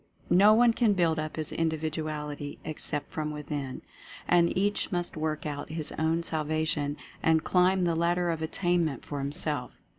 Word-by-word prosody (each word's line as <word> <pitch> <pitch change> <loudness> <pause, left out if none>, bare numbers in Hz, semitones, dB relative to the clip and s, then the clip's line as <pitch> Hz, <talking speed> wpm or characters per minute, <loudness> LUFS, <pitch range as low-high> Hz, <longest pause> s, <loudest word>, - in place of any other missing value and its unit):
No 205 +4 +7
one 235 0 +5
can 225 -3 +3
build 170 -4 +2
up 155 0 -4
his 155 -2 -3
Individuality 155 -2 -3
except 150 -1 -3
from 155 -1 -2
Within. 145 -3 -5 0.4
And 170 0 +3
each 205 +2 0
must 175 -1 -2
work 155 0 -2
out 145 -1 -4
his 155 -1 -3
own 160 +2 0
salvation 155 -2 -1 0.2
and 160 -1 +3
climb 185 +1 +3
the 170 -1 +2
Lad 170 +1 +2
der 175 -1 0
of 160 -1 -3
Attainment 170 -3 0
for 145 - -4
himself. 140 -2 -1
160 Hz, 160 wpm, -28 LUFS, 150-175 Hz, 0.4 s, No